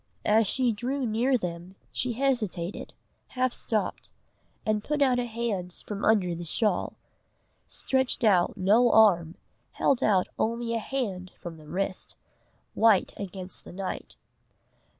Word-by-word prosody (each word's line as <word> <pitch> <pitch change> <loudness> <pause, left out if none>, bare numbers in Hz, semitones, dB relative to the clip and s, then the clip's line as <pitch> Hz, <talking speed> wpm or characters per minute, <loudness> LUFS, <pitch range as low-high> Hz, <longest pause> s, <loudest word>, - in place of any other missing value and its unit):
As 215 0 +4
she 250 +3 +2
drew 255 +5 -2
near 240 +4 +2
them, 180 -2 -6 0.2
she 250 -1 -1
hesitated, 220 -9 -1 0.4
half 255 -1 -1
stopped, 215 -3 -2 0.5
and 215 -1 0
put 300 +3 -1
out 260 -3 +3
a 245 - -1
hand 220 -6 -3
from 205 -1 -5
under 200 -5 +3
the 170 +1 -5
shawl 185 +3 0 0.7
stretched 260 -2 -1
out 190 -6 +3
no 220 +6 +4
arm, 175 -6 +5 0.4
held 270 - +2
out 190 -4 +3
only 230 +1 -1
a 230 - 0
hand 205 -8 -3
from 170 -2 -8
the 155 -1 -15
wrist, 185 +3 -3 0.6
white 220 -4 +4
against 190 -2 -7
the - - -11
night. 190 0 -5
215 Hz, 135 wpm, -27 LUFS, 185-240 Hz, 0.7 s, arm